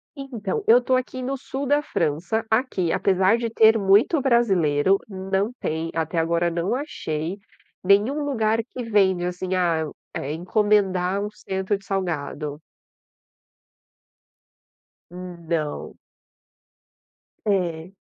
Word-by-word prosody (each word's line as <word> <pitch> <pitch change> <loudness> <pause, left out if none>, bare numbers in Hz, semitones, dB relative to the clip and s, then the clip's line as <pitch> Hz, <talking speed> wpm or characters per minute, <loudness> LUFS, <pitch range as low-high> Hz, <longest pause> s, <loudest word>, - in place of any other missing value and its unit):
E 275 - -7
então, 205 -5 -3
eu 240 +3 +7
tô 255 +1 +1
aqui 255 0 -3
no 265 +2 -2
sul 270 +1 -5
da 290 +1 +3
França. 170 - -1
Aqui, 220 -7 +1
apesar 190 +3 +3
de 235 -1 -2
ter 220 0 +5
muito 205 - +4
brasileiro, 195 - +3
não 195 +2 -2
tem 160 +1 -3
até 165 +1 -2
agora 170 +1 +1
não 170 +5 -1
achei, 170 - -4 0.5
nenhum 205 +10 +3
lugar 225 -5 +1
que 250 +1 -7
vende, 195 -5 +2
assim, 180 +1 -3
ah 170 -3 +1 0.3
eh, 140 +3 -3
encomendar 195 +1 +1
um 210 - -3
cento 190 0 -2
de 195 - -20
salgado. 155 -5 -3 2.5
Hum, 180 0 -8
não. 155 -3 -3 1.5
É. 180 -4 -1
190 Hz, 120 wpm, -23 LUFS, 170-225 Hz, 2.5 s, eu